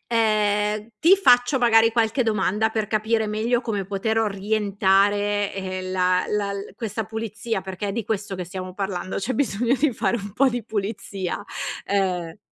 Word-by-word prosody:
Ehm, 215 -1 +1
ti 370 +4 +7
faccio, 245 -6 +4
magari, 225 -1 +5
qualche 230 +3 +1
domanda 210 0 +1
per 220 -1 -2
capire 220 +1 0
meglio 225 +3 0
come 205 -5 -2
poter 205 +3 -1
orientare, 205 -1 +1
ehm, 185 -1 -4
la 185 0 +2
la 205 -1 -1
l 200 +1 -7
questa 225 -1 -3
pulizia 220 -1 -4
perché 190 +2 -5
è - - -2
di 225 -1 -3
questo 205 -2 -3
che 180 - -4
stiamo 185 +1 -7
parlando. 190 -1 -4
C'è 225 +6 -2
bisogno 245 -2 +1
di 270 0 +1
fare 215 +1 0
un 200 -2 -7
po' 270 +4 +3
di 245 -2 -3
pulizia. 205 -3 -4 0.5
Uhm, 180 -3 -1
210 Hz, 165 wpm, -23 LUFS, 195-225 Hz, 0.5 s, ti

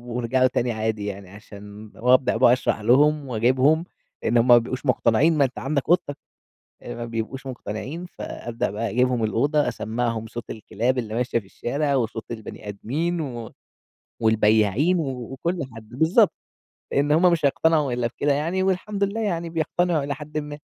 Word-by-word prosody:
وارجعوا 125 +2 +2
تاني 125 -1 -1
عادي 110 -1 -2
يعني 100 -2 -6
عشان 105 +1 -12
وأبدأ 125 -1 +3
بقى 125 0 +6
أشرح 125 -3 0
لهم 145 +5 +3
وأجيبهم 130 +7 +2 0.4
إن 120 - +2
هم 115 - +3
ما 120 -1 +8
بيبقوش 125 +4 -3
مقتنعين 130 +5 +3
ما 140 - +5
أنت 125 -4 -5
عندك 140 +4 -2
أوضتك، 170 -5 +2 0.7
ما 120 0 -6
بيبقوش 115 +4 -5
مقتنعين 130 - -6
فأبدأ 120 -8 -5
بقى 110 +3 -3
أجيبهم 125 -1 +1
الأوضة 145 +8 +1
أسمّعهم 115 0 -2
صوت 120 0 -8
الكلاب 115 +4 -2
اللي 110 -3 -3
ماشية 120 0 0
في 100 - -16
الشارع، 140 +8 -2
وصوت 115 -2 -3
البني 110 -2 -8
آدمين، 135 - -3 0.7
والبياعين 110 - +3
وكل 135 +4 -3
حد، 110 -1 -12
بالضبط، 160 - +3 0.6
لإن 145 +1 +2
هم 175 +3 +5
مش 160 -3 0
هيقتنعوا 150 -1 +2
إلّا 120 -1 0
بكده 145 +4 0
يعني 165 +6 0
والحمد 195 +2 0
لله 210 +3 -3
يعني 170 -5 -2
بيقتنعوا 165 -1 0
إلى 140 - -2
حدٍ 150 +1 -6
ما. 150 -1 -6
130 Hz, 155 wpm, -23 LUFS, 115-150 Hz, 0.7 s, ما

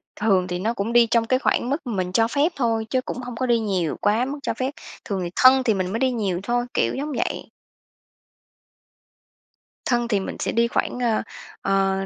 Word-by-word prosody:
Thường 195 -4 +2
thì 180 0 -3
nó 225 +5 0
cũng 225 +2 -3
đi 240 -1 +6
trong 230 -1 +3
cái 255 +2 +2
khoảng 245 - 0
mức 280 - +1
mình 185 -5 -2
cho 225 +4 +3
phép 285 +7 +1
thôi, 225 -4 0
chứ 255 +1 +1
cũng - - -6
hông 245 -1 -6
có 255 - -1
đi 235 -2 +3
nhiều 185 -7 -1
quá 220 +4 +2
mức 285 +2 -5
cho - - -1
phép, 260 +2 -2 0.3
thường 200 -3 -2
thì 175 - -3
thân 260 +1 +6
thì 225 -4 +2
mình 185 -1 -2
mới 225 - -2
đi 260 -1 +2
nhiều 200 -7 -1
thôi, 240 +3 0
kiểu - - +1
giống 295 +3 -3
vậy. - - -2 2.4
Thân 240 -1 +1
thì 210 -4 +1
mình 190 - -5
sẽ - - -1
đi 235 0 +2
khoảng, 245 - -2
ơ, 230 -3 +1 0.4
ờ, 195 0 +1
230 Hz, 215 wpm, -23 LUFS, 195-250 Hz, 2.4 s, đi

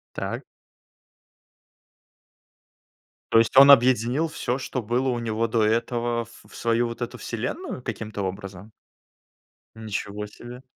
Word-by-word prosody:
Так. - - -4 2.9
То 115 - +7
есть 115 - +1
он 140 +1 +10
объединил 130 +3 +4
всё, 130 -5 -2
что 130 -1 -4
было 125 +4 0
у 120 - -1
него 115 0 -1
до 115 -1 +1
этого, 120 +1 0
в 115 - -18
в - - -15
свою 115 +1 +1
вот 115 +1 -8
эту 120 - -4
вселенную 125 - -5
каким-то 110 -3 -5
образом? 95 +1 -6 1.0
Ничего 105 -1 -5
себе. 120 +4 -11
115 Hz, 125 wpm, -25 LUFS, 110-125 Hz, 2.9 s, он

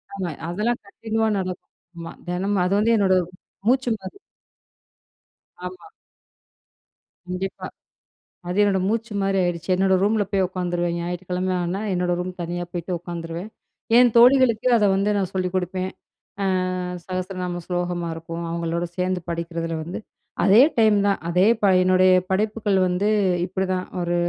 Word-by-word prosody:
ஆமா. 185 -3 -3 0.2
அதெல்லாம் 210 +7 -1
கன்டின்யூவா 220 +2 -2
நடக்கும் 185 -2 -6 0.3
ஆமா, 165 0 -7 0.2
தினமும். 185 +2 0
அது 190 - +1
வந்து 225 +2 +3
என்னோட 195 -2 +3
ஒரு 175 0 -8 0.4
மூச்சு 255 +1 +3
மாதிரி. 190 - -10 1.5
ஆமா. 185 - -8 1.4
கண்டிப்பா. 185 +1 -4 0.8
அது 180 +3 -2
என்னோட 200 -2 +3
மூச்சு 225 +1 -2
மாரி 195 0 +1
ஆயிடுச்சு. 175 0 -2
என்னோட 190 +1 +3
ரூமில 210 +1 +2
போய் 195 -1 +2
உக்காந்துருவேன், 175 -2 -2
ஞாயிற்றுக்கிழமை 180 +1 -2
ஆனா 180 +3 -2
என்னோட 180 -1 0
ரூம், 180 +1 -3
தனியா, 175 +1 -3
போயிட்டு 175 +1 -4
உக்காந்துருவேன். 170 +2 -6 0.5
என் 245 -1 +6
தோழிகளுக்கு 245 -1 +5
அத 215 - +2
வந்து 200 +2 +1
நான் 190 -3 -1
சொல்லிக் 185 -1 -2
கொடுப்பேன். 185 +1 -2 0.5
ஆ, - - +1 0.6
சகஸ்ரநாம 185 -1 -4
ஸ்லோகமா 175 -1 -2
இருக்கும், 165 +1 -6
அவங்களோட 170 0 -2
சேந்து 185 0 -1
படிக்குறதுல 165 0 -3
வந்து, 170 +3 -6 0.4
அதே 205 +5 +7 0.2
டைம் 215 -2 +5
தான், 200 - +1
அதே 180 +4 +3
ப - - +3 0.2
என்னுடய 185 0 +5 0.2
படைப்புகள் 210 0 +1
வந்து 180 +3 0 0.4
இப்பிடிதான். 185 0 -2 0.2
ஒரு 175 0 -1
185 Hz, 135 wpm, -23 LUFS, 175-200 Hz, 1.5 s, அதே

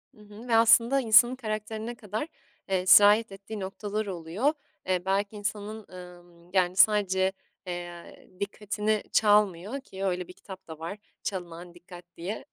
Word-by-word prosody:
Hı 210 - -18
hı 210 +3 -13
ve 230 - +2
aslında 230 +4 +5
insanın 240 +2 +6
karakterine 220 0 -5
kadar, 215 +6 -5 0.4
eee, 185 -1 0
sirayet 205 +3 +7
ettiği 200 +2 -8
noktalar 205 +2 -4
oluyor. 190 - -1 0.3
Eee, 185 -1 0
belki 200 +2 0
insanın, 210 +1 -5
emm, 175 -1 -13
yani, 180 -1 +2
sadece, 190 -2 +3 0.4
eee, 175 -1 -8
dikkatini 210 +1 -2
çalmıyor 210 +3 +2
ki 195 -6 -7
öyle 180 -1 -2
bir 180 - -11
kitap 190 -2 -12
da 160 -1 -9
var 170 +5 -6 0.3
"Çalınan 175 -2 -6
Dikkat" 175 0 -13
diye. 185 +6 -5
200 Hz, 145 wpm, -27 LUFS, 180-215 Hz, 0.4 s, sirayet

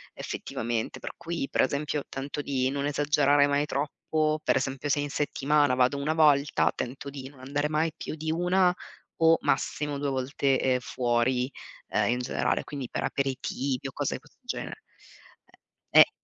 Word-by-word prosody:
effettivamente. 115 -1 -3
Per - - -6
cui 165 -4 -3
pre - - +4
esempio 145 0 -2
tento 140 +2 -4
di 130 -2 0
non 140 0 -2
esagerare 145 -1 +3
mai 145 +1 +2
troppo. 155 +2 -1
Per - - +3
esempio 135 +2 -1
se 145 - +2
in 145 - -3
settimana, 145 -1 +2
vado 125 +2 +3
una 150 +3 -1
volta, 145 -3 +4
tento 135 +3 -5
di 135 -1 -7
non 140 -2 -18
andare 145 +3 -1
mai 155 +2 +1
più - - -5
di 155 0 -3
una 180 +2 +3 0.4
o 165 0 +5
massimo 145 +1 0
due 145 - -1
volte, 135 0 +1
ehm, 130 -1 +2
fuori, 125 +1 0 0.4
ehm, - - +1
in 125 - 0
generale, 125 +1 0
quindi 140 -4 -6
per - - -3
aperitivi 135 0 -2
o - - -6
cose 145 - -1
di - - -6
questo 150 +3 -24
genere. 245 - -5 1.1
Eh, - - +7
eh. - - +6
140 Hz, 170 wpm, -28 LUFS, 130-150 Hz, 1.1 s, Eh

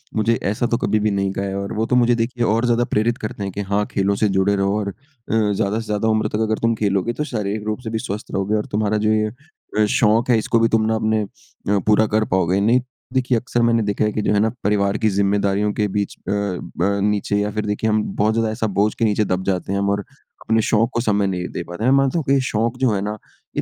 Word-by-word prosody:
मुझे 115 +1 +2
ऐसा 105 +4 0
तो 115 - +1
कभी 110 -2 +1
भी 105 0 +1
नहीं 100 -1 0
कहा 100 - -3
है। 95 0 -3
और 100 0 -4
वो 110 +1 0
तो 125 - 0
मुझे 120 -1 +4
देखिए 120 +1 -1
और 115 +3 +1
ज़्यादा 120 0 +2
प्रेरित 115 +3 +1
करते 105 -1 -5
हैं 100 - -3
कि, 100 - -4
"हाँ, 100 +1 0
खेलों 100 0 +1
से 105 +1 +1
जुड़े 95 +1 +2
रहो 100 +1 +1
और 100 -1 -2
अ, - - -7 0.6
ज़्यादा 100 +1 0
से 115 - -6
ज़्यादा 105 0 -1
उम्र 110 -1 +2
तक 105 - -3
अगर 110 0 0
तुम 115 0 +2
खेलोगे 100 +1 0
तो 150 - -2
शारीरिक 105 -6 -3
रूप 110 +1 -2
से 110 - -4
भी 110 0 -2
स्वस्थ 105 -2 -6
रहोगे 100 +2 0
और 105 - -1
तुम्हारा 105 0 +1
जो 105 +1 +1
ये 110 0 +1 0.5
अ 105 - +5
शौक़ 115 +2 +3
है 120 - +5
इसको 115 +1 +1
भी 115 - +4
तुम 110 -1 +2
ना 110 0 +1
अपने 110 0 +1
अ, 100 0 -4
पूरा 110 +1 +4
कर 110 +1 +1
पाओगे।" 95 0 +2
नहीं, 120 +5 +3 0.3
देखिए 130 -2 +2
अक्सर 120 +1 -1
मैंने 115 -1 +3
देखा 105 +1 0
है 105 - 0
कि 110 - -1
जो 105 - +1
है 105 - +3
ना 110 +2 +3
परिवार 100 0 +1
की 110 - +1
ज़िम्मेदारियों 100 +1 +1
के 105 0 0
बीच 100 0 -2
अ, - - +1
अ, 100 -3 -1 0.4
नीचे 105 0 0
या 105 0 0
फिर 105 0 -3
देखिए 105 +2 -1
हम 110 0 +2
बहुत 105 +2 +2
ज़्यादा 115 -1 0
ऐसा 110 0 -1
बोझ 105 +1 +3
के 115 - +1
नीचे 105 0 +1
दब 95 -1 -1
जाते 95 -1 -1
हैं 100 - 0
हम 100 0 0
और 100 0 +1 0.5
अपने 110 0 +4
शौक़ 110 +1 +2
को 120 - 0
समय 105 -3 +1
नहीं 90 -2 -2
दे - - -3
पाते 90 +5 -6
हैं। 125 - +3
मैं 135 - +5
मानता 135 +3 +2
हूँ - - -3
कि 135 0 +4
शौक़ 115 -1 -1
जो 130 -3 +3
है 100 - 0
ना 105 +1 -3 0.4
ये - - 0
105 Hz, 270 wpm, -21 LUFS, 100-115 Hz, 0.6 s, अ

